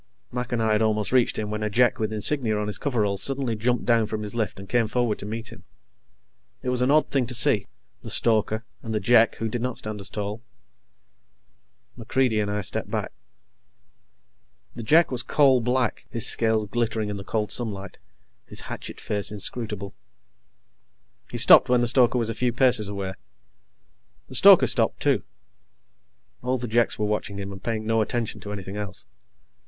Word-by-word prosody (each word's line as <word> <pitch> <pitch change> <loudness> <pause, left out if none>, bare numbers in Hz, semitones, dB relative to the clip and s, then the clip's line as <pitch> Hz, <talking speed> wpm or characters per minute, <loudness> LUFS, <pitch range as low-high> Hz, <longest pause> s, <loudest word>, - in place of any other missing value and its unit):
Mac 125 0 -5
and 115 -2 -1
I 110 - +1
had 105 0 +1
almost 110 -1 0
reached 125 -2 +2
him 105 -1 -4
when 105 0 -4
a 105 - -1
Jek 120 +3 +2
with 110 -1 -2
insignia 110 +1 +3
on 105 - -2
his 105 - -3
coveralls 105 -8 -1
suddenly 135 -4 0
jumped 120 +3 -1
down 115 -2 +2
from 105 0 -5
his 105 - -5
lift 110 -4 -3
and 95 - -10
came 120 0 +1
forward 120 -1 -1
to 100 - -7
meet 115 +2 -6
him. - - -14 1.0
It 130 - -2
was 125 -1 -1
an 125 - +1
odd 155 +2 +3
thing 130 -4 0
to 125 - 0
see 115 - +3 0.3
the - - -9
stoker, 110 0 +3 0.2
and 110 -1 -5
the - - 0
Jek, 115 +2 +3
who 115 - -4
did 115 +2 -4
not 125 -1 -3
stand 105 -1 -6
as 95 - -5
tall. 105 +1 -5 1.5
MacReidie 120 -1 0
and 105 - -3
I 105 0 -2
stepped - - -3
back. - - -4 1.6
The - - -6
Jek 160 +9 +3
was 125 -2 +1
coal 135 -3 +3
black, 125 0 -2
his 115 0 +2
scales 110 -3 +6
glittering 110 0 -2
in 100 - -5
the 100 - -8
cold 105 0 -3
sunlight, 100 -5 -4 0.5
his - - -4
hatchet - - -8
face 105 -1 -1
inscrutable. 105 -1 -4 1.4
He - - -6
stopped 135 - +6
when 125 -1 +3
the 120 - +1
stoker 125 0 +3
was 115 -2 -1
a - - -4
few 125 0 -1
paces 120 -4 +2
away. 100 -2 -5 1.2
The - - -11
stoker - - +7
stopped, - - 0
too. - - +1 1.2
All 125 +1 -1
the 125 0 -5
Jeks 120 +1 +1
were 105 - -1
watching 105 -1 -3
him 100 0 -6
and 95 -1 -10
paying 110 -2 -3
no 115 0 +1
attention 115 +1 -3
to 105 - -8
anything 100 -1 -7
else. 100 -2 -7
110 Hz, 190 wpm, -24 LUFS, 105-120 Hz, 1.6 s, stoker